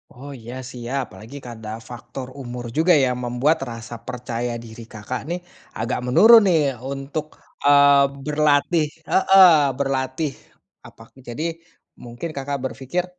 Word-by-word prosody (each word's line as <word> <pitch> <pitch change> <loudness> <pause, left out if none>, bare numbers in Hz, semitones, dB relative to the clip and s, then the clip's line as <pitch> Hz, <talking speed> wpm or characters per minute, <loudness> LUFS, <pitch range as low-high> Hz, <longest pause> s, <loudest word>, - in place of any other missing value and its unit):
Oh 135 +4 -10
iya 120 +2 -9 0.2
siap, 125 +2 -3
apalagi, 115 +6 -11
kan, 120 - -7
ada 110 - -7 0.2
faktor 125 +2 -8
umur 120 -1 -7
juga 170 +3 +4
yang 125 -1 -1
membuat 125 +7 +1
rasa 115 +1 -8
percaya 120 -1 -4
diri 115 +1 -11
Kakak, 110 +4 -5
nih, 175 +1 -2 0.4
agak 115 +3 -1
menurun, 225 - +7
nih, 165 -3 +4 0.3
untuk, 140 +2 -4 0.4
eee, 140 0 +6 0.2
berlatih 150 +2 +2 0.3
heeh, 190 0 +6 0.3
berlatih 135 +2 -1 0.5
apa - - -15
aku 130 - -22
jadi 120 +6 -4 0.6
mungkin 120 +7 -6
Kakak 140 +1 -3
berpikir 130 +8 -3
135 Hz, 135 wpm, -22 LUFS, 120-150 Hz, 0.6 s, menurun